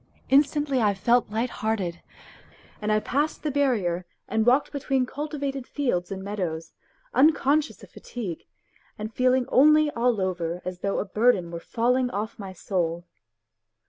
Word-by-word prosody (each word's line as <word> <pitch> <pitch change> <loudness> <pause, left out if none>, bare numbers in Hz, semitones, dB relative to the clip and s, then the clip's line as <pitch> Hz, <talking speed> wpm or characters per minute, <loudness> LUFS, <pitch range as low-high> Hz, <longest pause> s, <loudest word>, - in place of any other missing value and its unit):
Instantly 280 -1 +3
I 205 -2 +2
felt 235 +5 +2
lighthearted, 220 -5 -2 0.8
and 210 0 0
I 215 - +3
passed 290 +8 -1
the 300 - -1
barrier 220 -11 +1 0.2
and 220 +2 0
walked 260 +4 +4
between 270 -2 0
cultivated 280 -1 -4
fields 225 -11 -1
and 190 0 -5
meadows, 180 -5 -4 0.4
unconscious 300 +1 +3
of - - -14
fatigue, 200 -10 -7 0.5
and 215 +1 -6
feeling 255 +1 +2
only 305 +2 +5
all 235 -3 +1
over 180 -2 -2
as 180 -1 -5
though 200 +2 -1
a - - -1
burden 205 -4 +2
were 170 - -5
falling 250 +6 +1
off 215 0 -4
my 195 -2 -6
soul. 175 -2 -2
230 Hz, 145 wpm, -25 LUFS, 190-270 Hz, 0.8 s, only